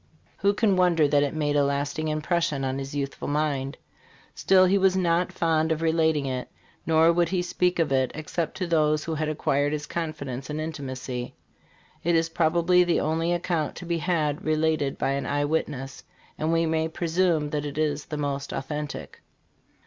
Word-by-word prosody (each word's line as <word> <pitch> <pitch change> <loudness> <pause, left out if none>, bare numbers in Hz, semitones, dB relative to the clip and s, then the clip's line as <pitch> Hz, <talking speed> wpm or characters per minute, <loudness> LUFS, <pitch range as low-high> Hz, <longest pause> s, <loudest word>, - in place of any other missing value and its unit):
Who 200 +1 +2
can 200 -3 +2
wonder 170 -4 +4
that 145 0 +3
it 145 +1 -1
made 145 -2 0
a 145 - +4
lasting 145 +2 -1
impression 155 -2 0
on 130 +1 -2
his 135 +1 -6
youthful 140 -1 -3
mind? 145 -2 -1 0.6
Still, 185 -1 +4
he 195 +2 +3
was 190 0 +3
not 175 -1 +1
fond 160 -1 +1
of 160 +1 -1
relating 160 -3 +2
it, 130 -1 -3 0.4
nor 165 +1 +5
would 170 -1 +2
he 180 -1 0
speak 180 0 0
of 165 -4 +1
it 130 -1 +2
except 155 +1 -3
to 185 - -1
those 155 -2 +2
who 165 - -3
had 155 0 -1
acquired 145 -1 0
his 150 -1 -3
confidence 145 -5 -5
and 150 +1 -3
intimacy. 130 -5 -5 0.7
It 170 0 +2
is 165 0 +2
probably 170 +2 +3
the 175 -1 +1
only 165 +2 0
account 170 -3 -1
to 180 - -8
be 170 -1 -1
had 155 -4 0
related 155 -2 0
by 135 - 0
an 140 0 -2
eye 145 0 0
witness, 140 -3 -3 0.3
and 155 +1 -1
we 165 0 +2
may 160 0 0
presume 165 -2 0
that 150 -1 -1
it 145 0 -6
is 150 -2 0
the 150 - -4
most 140 -1 -3
authentic." 145 +1 -5
155 Hz, 185 wpm, -26 LUFS, 145-170 Hz, 0.7 s, nor